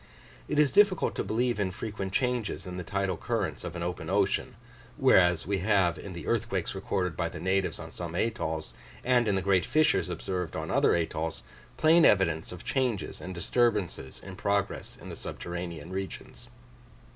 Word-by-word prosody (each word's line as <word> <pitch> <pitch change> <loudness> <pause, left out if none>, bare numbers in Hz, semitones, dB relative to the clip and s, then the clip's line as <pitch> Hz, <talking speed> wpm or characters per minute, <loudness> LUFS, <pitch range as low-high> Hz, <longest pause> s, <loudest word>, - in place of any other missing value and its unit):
It 150 - -2
is 150 -3 +5
difficult 200 - +4
to - - -2
believe 115 +3 0
in 100 -2 +1
frequent 100 0 -5
changes 125 -1 -1
in 90 -1 -6
the 90 - -4
tidal 100 +1 -1
currents 100 -11 -2
of 90 -1 -5
an 85 - -3
open 90 +1 -4
ocean; - - +1 0.4
whereas, 90 -2 +5
we 100 0 0
have 95 -3 +2
in 95 - -7
the 85 - -7
earthquakes 110 -6 -1
recorded 95 -3 -2
by 85 0 -1
the - - -8
natives 95 +1 0
on - - -8
some 85 -1 -6
atolls, 80 -7 -2 0.3
and 120 -2 +3
in 100 - +2
the 95 - 0
great 95 -2 +3
fissures 155 - +2
observed 90 0 -3
on - - -3
other - - +4
atolls, 80 -1 -2 0.3
plain 160 +2 +6
evidence 85 -5 +3
of 90 -1 -9
changes 125 -7 -1
and 95 0 -6
disturbances 105 - 0
in 95 -1 -8
progress 100 0 -1
in - - -10
the - - -6
subterranean 85 -2 -6
regions. 95 0 -6
95 Hz, 175 wpm, -29 LUFS, 90-110 Hz, 0.4 s, plain